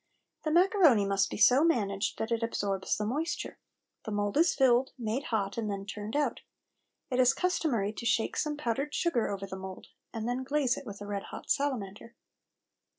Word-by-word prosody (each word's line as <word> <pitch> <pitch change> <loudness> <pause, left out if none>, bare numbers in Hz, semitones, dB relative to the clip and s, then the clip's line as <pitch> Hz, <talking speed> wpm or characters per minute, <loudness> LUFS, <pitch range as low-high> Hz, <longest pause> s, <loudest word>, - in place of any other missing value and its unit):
The - - +1
macaroni 340 - +5
must 195 0 +1
be - - -5
so 250 +7 +6
managed 205 -10 +1
that 220 +1 -3
it 230 0 +1
absorbs 200 -4 -1
the 210 - -2
moisture. 300 +9 -3 0.4
The - - -6
mould 205 -1 -1
is 330 +2 +4
filled, 260 -1 +3
made 235 +3 -2
hot, 205 -1 -1
and 215 -2 -2
then 200 -1 -4
turned 210 +3 -6
out. 295 0 0 0.7
It 250 - 0
is 255 +1 +5
customary 270 - 0
to 235 - -7
shake 225 - +1
some 300 -1 -1
powdered 275 +2 -2
sugar 280 -10 +1
over 195 -1 -4
the 190 -1 -7
mould, 190 0 -9 0.2
and 225 -1 -4
then 250 +2 -1
glaze 275 -2 +1
it 270 - -9
with 205 -1 -8
a - - -5
red 205 -1 -4
hot - - -6
salamander. 230 -5 -2
230 Hz, 190 wpm, -30 LUFS, 205-280 Hz, 0.7 s, so